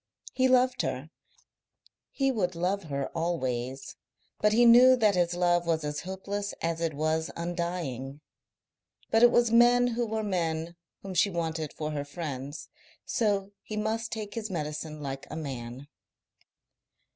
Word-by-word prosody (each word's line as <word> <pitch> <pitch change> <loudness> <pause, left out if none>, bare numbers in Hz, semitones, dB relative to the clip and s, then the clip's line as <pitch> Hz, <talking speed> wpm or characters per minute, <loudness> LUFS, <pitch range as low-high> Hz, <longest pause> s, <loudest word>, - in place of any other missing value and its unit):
He 260 0 +3
loved 255 0 +3
her, 135 +6 -4 1.0
he 270 -1 +1
would 185 -7 -1
love 185 +3 -1
her 140 -2 -3
always, 130 -6 -2 0.4
but 210 - +3
he 240 +3 +5
knew 250 +2 +8
that 215 -4 +3
his 175 -1 +1
love 175 -1 +2
was 160 -2 +1
as 150 0 -3
hopeless 200 +2 -4
as 165 0 -2
it 165 -3 -1
was 155 +2 0
undying. 170 -6 -4 0.9
But 225 - +4
it 240 - +9
was 240 -1 +3
men 245 +1 +5
who 235 0 -1
were 220 0 -2
men 170 -4 -2 0.3
whom 195 -1 -6
she 185 +3 +3
wanted 160 -4 -3
for 155 0 -4
her 145 -1 -2
friends, 145 -2 -6 0.4
so 200 -3 0
he 215 - -6
must 225 +2 -2
take 210 -2 -5
his 220 -2 -4
medicine 150 -2 -4
like 135 0 -5
a - - -6
man. 135 -3 -6
175 Hz, 150 wpm, -28 LUFS, 150-215 Hz, 1.0 s, it